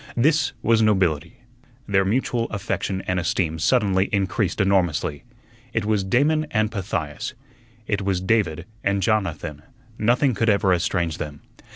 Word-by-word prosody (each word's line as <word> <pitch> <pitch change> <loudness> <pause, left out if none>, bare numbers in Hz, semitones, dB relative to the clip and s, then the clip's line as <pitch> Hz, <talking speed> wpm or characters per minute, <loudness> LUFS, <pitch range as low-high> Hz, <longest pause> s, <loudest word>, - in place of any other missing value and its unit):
This 150 +4 +3
was 115 0 +4
nobility. 85 -7 +1 0.5
Their 95 -1 +3
mutual 115 +3 0
affection 100 -1 -3
and 90 0 0
esteem 80 -2 -1
suddenly 95 0 +2
increased 100 -1 0
enormously. 90 -6 +1 0.5
It 115 -3 0
was 105 -2 +1
Damon 150 +10 +2
and 110 -1 +1
Pythias; 90 - -4 0.5
it 105 -1 -1
was 95 -2 0
David 90 -4 0 0.2
and 100 -1 +1
Jonathan; 85 -9 -1 0.4
nothing 125 +4 +3
could 115 +2 +1
ever 100 -2 +3
estrange 85 -2 -1
them. 70 -1 -6
100 Hz, 135 wpm, -23 LUFS, 90-110 Hz, 0.5 s, was